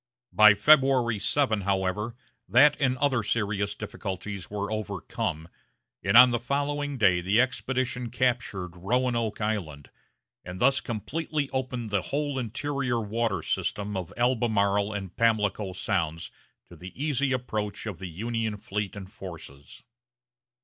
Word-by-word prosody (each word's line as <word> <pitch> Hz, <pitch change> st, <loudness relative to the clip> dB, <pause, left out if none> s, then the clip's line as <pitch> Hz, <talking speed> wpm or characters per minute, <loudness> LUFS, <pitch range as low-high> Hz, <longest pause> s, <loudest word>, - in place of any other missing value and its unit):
By 105 Hz, -1 st, +8 dB
February 130 Hz, -2 st, +4 dB
7, 110 Hz, 0 st, +1 dB
however, 100 Hz, +3 st, -1 dB, 0.3 s
that 140 Hz, +8 st, +6 dB
and 130 Hz, -2 st, +1 dB
other 130 Hz, -3 st, +2 dB
serious 100 Hz, -2 st, -1 dB
difficulties 100 Hz, -2 st, -6 dB
were 100 Hz, 0 st, -3 dB
overcome, 85 Hz, -6 st, -3 dB, 0.6 s
and 100 Hz, +4 st, +4 dB
on 125 Hz, 0 st, +9 dB
the 120 Hz, -, 0 dB
following 145 Hz, +2 st, -2 dB
day 95 Hz, -6 st, +4 dB
the 100 Hz, +6 st, +2 dB
expedition 125 Hz, -1 st, -1 dB
captured 115 Hz, -8 st, -1 dB
Roanoke 115 Hz, +3 st, 0 dB
Island, 90 Hz, -10 st, -3 dB, 0.5 s
and 90 Hz, +1 st, -8 dB
thus 135 Hz, +2 st, +3 dB
completely 145 Hz, +5 st, -3 dB
opened 125 Hz, -4 st, -3 dB
the 100 Hz, -2 st, +1 dB
whole 145 Hz, +2 st, -2 dB
interior 130 Hz, +1 st, -2 dB
water 110 Hz, -4 st, -1 dB
system 105 Hz, 0 st, -2 dB
of 90 Hz, -3 st, -4 dB
Albemarle 110 Hz, -5 st, +2 dB
and 95 Hz, -3 st, -6 dB
Pamlico 105 Hz, -3 st, +1 dB
sounds 85 Hz, -5 st, -2 dB, 0.4 s
to -, -, -12 dB
the 90 Hz, +1 st, -11 dB
easy 140 Hz, -2 st, 0 dB
approach 110 Hz, -6 st, -3 dB
of 105 Hz, -6 st, -5 dB
the 95 Hz, -, -5 dB
Union 110 Hz, +4 st, -3 dB
fleet 105 Hz, 0 st, -4 dB
and 95 Hz, -1 st, -9 dB
forces. 80 Hz, -, -11 dB
110 Hz, 130 wpm, -27 LUFS, 100-125 Hz, 0.6 s, on